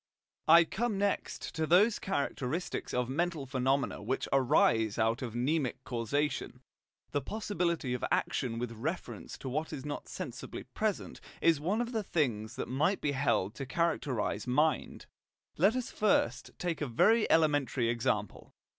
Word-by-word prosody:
I 165 +2 +9
come 215 +5 -2
next 200 0 -2
to 160 -2 -1
those 205 +7 +5
characteristics 155 -2 -2
of 125 -1 0
mental 160 +2 -1
phenomena 135 -1 0
which 125 +6 -2
arise 115 -5 +3
out 115 +2 +1
of 120 -3 -5
mnemic 135 +2 0
causation. 130 +1 -2 0.5
The 145 - 0
possibility 170 - -1
of 125 - -3
action 120 -4 0
with 120 0 -3
reference 145 +11 -5
to - - -8
what 155 +5 -2
is 135 - -6
not 145 -1 -5
sensibly 140 -9 -6
present 215 -2 -3 0.2
is 165 -3 +4
one 200 +9 0
of 240 0 -3
the 225 -3 0
things 120 - -1
that - - -4
might 155 +10 +1
be 145 - 0
held 135 -8 +1
to 135 +3 -6
characterize 125 -8 -1
mind. 150 +3 +1 0.5
Let 195 +8 +5
us 255 -2 -3
take - - -20
first 130 - +2
a 165 -4 -1
very 215 - +3
elementary 145 -6 +3
example. 110 -3 -2
145 Hz, 150 wpm, -31 LUFS, 125-170 Hz, 0.5 s, I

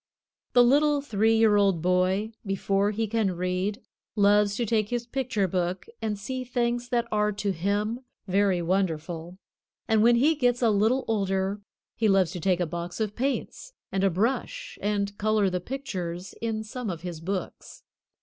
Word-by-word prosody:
The 245 - +7
little 290 +4 +4
three 225 -2 +2
year 220 -2 +5
old 195 -5 +2
boy 185 +4 +1
before 195 0 0
he 220 +2 -1
can 210 -4 0
read, 180 +3 -2 0.3
loves 205 -1 +4
to 240 - -1
take 215 -1 +1
his 240 -1 -2
picture 245 -6 -1
book 180 0 -2 0.2
and 215 -2 -2
see 255 +6 -4
things 240 0 -1
that 240 -1 0
are 210 0 +2
to 205 0 -1
him 205 +6 -1 0.3
very 190 -2 +2
wonderful, 170 -1 -2 0.5
and 220 -2 +3
when 235 +2 +6
he 285 +7 +4
gets 245 -4 +1
a 225 - +5
little 220 +6 +2
older 195 -1 0 0.3
he 225 - +1
loves 195 -4 +3
to 180 - -5
take 180 +1 +1
a 175 - +1
box 170 +3 -5
of 215 -2 -2
paints 275 - -3 0.2
and 195 0 0
a 195 - +4
brush 260 - -2
and 200 -1 -1
color 215 -2 +2
the 180 0 -2
pictures 185 -8 -5
in 220 -1 -2
some 225 +1 -5
of 170 -3 -5
his 175 -3 -6
books. 185 +2 -5
205 Hz, 170 wpm, -27 LUFS, 185-230 Hz, 0.5 s, The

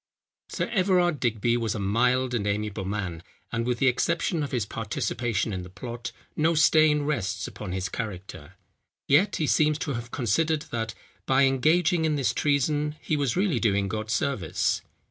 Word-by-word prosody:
Sir - - -2
Everard 180 - +2
Digby 115 0 +1
was 115 -2 -1
a - - -3
mild 125 +5 +1
and 105 -4 -1
amiable 105 -1 -2
man, 95 -5 -3 0.3
and, 115 +1 -1
with 125 -1 0
the 135 - +1
exception 150 +6 +1
of 145 - -3
his 120 -5 0
participation 110 0 -2
in 95 - -3
the 90 - -9
plot, 120 +5 -7 0.2
no 160 +2 +2
stain 155 -1 +4
rests 110 -8 -2
upon 105 -4 -7
his 95 0 -2
character; 100 -2 -7 0.5
yet 150 +9 +4
he 155 - 0
seems 150 0 +3
to 155 -3 -3
have 120 -1 -5
considered 150 +7 0
that, 115 -1 -3 0.3
by 135 +1 +4
engaging 155 +6 +3
in 155 -1 +1
this 130 -6 +1
treason, 150 +1 +1
he 155 - -1
was 140 -4 0
really 185 - +2
doing 100 -3 +1
God 110 +1 -4
service. 115 - 0
120 Hz, 170 wpm, -26 LUFS, 105-150 Hz, 0.5 s, stain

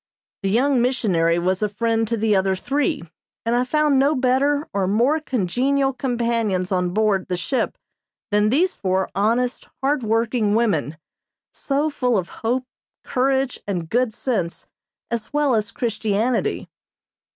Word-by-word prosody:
The 195 - -1
young 255 +4 +3
missionary 185 -10 +2
was 185 +3 0
a 210 - +1
friend 225 +2 0
to 230 +1 -1
the 215 -1 +2
other 190 0 +2
three, 270 +2 -1 0.4
and 230 +1 +1
I 245 - +3
found 295 +1 +2
no 285 +3 +3
better 275 +4 +1
or 195 -2 0
more 240 +10 +2
congenial 270 - 0
companions 230 -8 -1
on 180 -1 +1
board 200 0 +1
the 180 - -2
ship 260 +9 -1 0.5
than 210 +1 +3
these 345 - +2
four 190 0 -1
honest, 235 +5 0 0.2
hard 280 +1 +2
working 225 -1 +1
women, 165 -10 0 0.6
so 290 +2 -1
full 250 -5 +1
of 180 -2 -2
hope, 250 +3 0 0.4
courage 265 0 0
and 175 -5 -3
good 245 0 +2
sense 210 -7 -2 0.5
as 235 -2 -3
well 295 -3 +2
as 215 -2 0
Christianity. 225 0 -1
230 Hz, 145 wpm, -22 LUFS, 200-265 Hz, 0.6 s, young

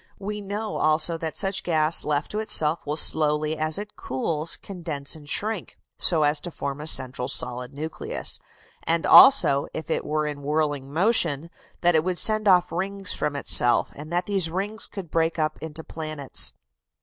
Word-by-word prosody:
We 210 +1 -6
know 205 +2 -5
also 155 +2 +4
that 160 -1 -5
such 195 0 +3
gas 160 -1 +1
left 145 -1 -2
to 210 - -3
itself 160 -8 +1
will 150 - -2
slowly 155 0 +1
as 155 0 -1
it 210 +1 -8
cools 150 +5 -3
condense 165 -7 -3
and 150 -2 -13
shrink, 215 +2 -4 0.2
so 160 -4 +3
as 145 0 +3
to 175 - -6
form 140 -3 -6
a 150 - -6
central 130 -4 +3
solid 125 -1 +1
nucleus; 155 +3 -1 0.4
and 165 0 -1
also, 265 - +6
if 160 - -6
it - - -1
were 150 0 -2
in 145 -1 -6
whirling 145 -2 -2
motion, 170 -4 +1 0.3
that 175 0 +3
it 160 -1 +2
would 180 0 -2
send 215 +1 +3
off 180 -2 +3
rings 195 +2 -3
from 150 -1 -3
itself, 120 -3 +2
and 155 +3 -11
that 175 +1 -1
these 195 -4 0
rings 200 +5 -5
could 190 -6 -9
break 165 0 0
up 155 -1 -2
into 160 0 -6
planets. 155 -4 -2
160 Hz, 175 wpm, -24 LUFS, 150-185 Hz, 0.4 s, also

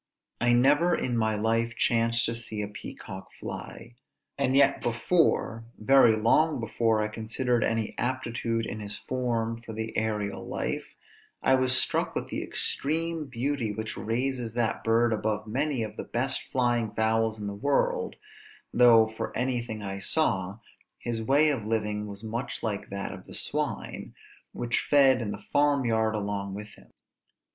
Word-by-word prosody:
I 120 0 +3
never 145 +8 +4
in 125 - -1
my 110 -1 +1
life 115 +2 0
chanced 115 0 +2
to 115 - 0
see 115 -2 -3
a - - -3
peacock 95 -2 -9
fly; 115 +1 -7 0.4
and 135 -1 +1
yet 140 0 +4
before, 120 -2 +1
very 120 0 +5
long 140 +8 +3
before 115 -1 +1
I - - 0
considered 115 +2 -1
any 115 -1 -1
aptitude 115 -2 -1
in 110 - -5
his 105 0 -3
form 115 -3 -2
for 115 -1 -8
the 110 +1 -4
aërial 105 -2 -1
life, - - -3 0.5
I 130 - +4
was 130 0 +3
struck - - 0
with - - -3
the - - -3
extreme 160 +1 -1
beauty 130 -2 -2
which 110 +1 -5
raises 120 0 -2
that 115 -2 0
bird 115 +1 +3
above 110 0 -1
many 130 +2 -1
of 105 - -7
the - - -4
best 130 +3 -1
flying 120 -4 +1
fowls 110 0 +1
in 105 - -5
the 100 - -3
world; 305 - 0 0.6
though, 115 -2 +7
for 110 0 -5
anything 120 -3 -2
I 95 0 -4
saw, 100 - +1 0.4
his 115 -1 -3
way 145 +6 +4
of 115 -7 -3
living 105 -1 -1
was 100 +1 -7
much 115 +3 -4
like 105 -3 -3
that 100 0 -4
of - - -11
the - - -6
swine, - - -2 0.4
which 120 0 -1
fed 135 -3 +4
in 110 - -3
the 100 0 -7
farm 145 -2 +3
yard 110 -1 +1
along 100 -2 -3
with 105 +1 -7
him. - - -18
115 Hz, 160 wpm, -28 LUFS, 110-130 Hz, 0.6 s, though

